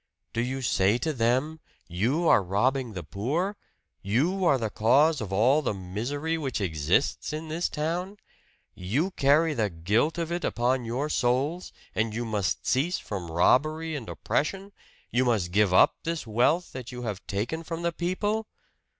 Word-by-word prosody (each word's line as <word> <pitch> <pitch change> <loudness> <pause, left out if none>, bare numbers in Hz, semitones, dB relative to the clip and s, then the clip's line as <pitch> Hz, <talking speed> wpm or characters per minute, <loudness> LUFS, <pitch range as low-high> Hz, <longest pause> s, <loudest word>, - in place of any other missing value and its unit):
Do 115 - 0
you 130 +2 -3
say 100 -1 +3
to 155 +5 -2
them: 130 +6 0 0.3
'You 120 - 0
are - - +6
robbing 120 +6 0
the 90 -3 -5
poor. 160 - -2 0.5
You 155 - 0
are 140 -5 +4
the 110 -4 -3
cause 140 +9 +3
of 100 -3 -5
all 125 +10 +4
the 125 - -2
misery 125 - -3
which 135 -6 -2
exists 85 - 0
in 155 +1 -5
this 165 +3 -1
town 175 +6 -3 0.6
you 130 - -1
carry 155 +1 +3
the 110 -6 0
guilt 105 - 0
of 170 -1 -3
it 175 +1 -2
upon 125 +1 0
your 125 +6 -2
souls. 140 +6 0 0.2
And 110 0 -1
you 120 +1 -2
must 105 -4 -1
cease 160 +8 +1
from 95 -5 -6
robbery 155 - +2
and 125 -7 -6
oppression 195 +6 -2 0.4
you 125 +2 +2
must 110 -8 +1
give 105 0 +3
up 90 - +5
this 165 -3 -3
wealth 125 +11 +1
that 130 -2 -7
you 125 0 -7
have 105 -4 -5
taken 115 +11 -2
from 165 +1 -5
the 170 - +1
people!' 205 +6 -1
130 Hz, 165 wpm, -27 LUFS, 105-160 Hz, 0.6 s, are